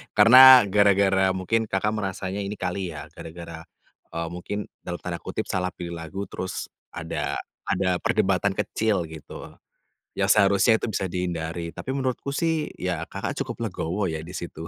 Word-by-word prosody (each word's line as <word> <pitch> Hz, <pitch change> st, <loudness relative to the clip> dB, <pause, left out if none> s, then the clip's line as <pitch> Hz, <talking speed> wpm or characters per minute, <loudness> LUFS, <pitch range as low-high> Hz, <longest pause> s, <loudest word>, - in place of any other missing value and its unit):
karena 125 Hz, +4 st, +10 dB
gara-gara 95 Hz, -2 st, +4 dB
mungkin 110 Hz, +5 st, 0 dB
Kakak 105 Hz, +2 st, 0 dB
merasanya 95 Hz, -2 st, -3 dB
ini 100 Hz, +1 st, -4 dB
kali 90 Hz, -1 st, -3 dB
ya, 75 Hz, -, -8 dB
gara-gara, 85 Hz, 0 st, -9 dB, 0.5 s
eee, 85 Hz, 0 st, -2 dB
mungkin 90 Hz, +4 st, -5 dB, 0.2 s
dalam 90 Hz, -, -5 dB
tanda 85 Hz, -1 st, -4 dB
kutip -, -, -4 dB
salah 90 Hz, -1 st, 0 dB
pilih 85 Hz, -1 st, -6 dB
lagu 80 Hz, +5 st, -5 dB
terus 95 Hz, -, -5 dB, 0.2 s
ada -, -, -3 dB, 0.3 s
ada 95 Hz, 0 st, +1 dB
perdebatan 100 Hz, -4 st, +1 dB
kecil 105 Hz, -4 st, 0 dB
gitu, 80 Hz, -1 st, -10 dB, 0.7 s
yang -, -, +1 dB
seharusnya 100 Hz, +3 st, +4 dB
itu -, -, -2 dB
bisa 95 Hz, -, -1 dB
dihindari, 85 Hz, -2 st, -3 dB
tapi 130 Hz, -, -4 dB
menurutku 135 Hz, 0 st, -2 dB
sih 160 Hz, -1 st, 0 dB
ya 90 Hz, -3 st, -2 dB
Kakak -, -, -5 dB
cukup -, -, -4 dB
legowo 95 Hz, +4 st, -2 dB
ya 80 Hz, -1 st, -4 dB
di 85 Hz, -, -10 dB
situ. 85 Hz, -2 st, -6 dB
95 Hz, 155 wpm, -25 LUFS, 85-105 Hz, 0.7 s, karena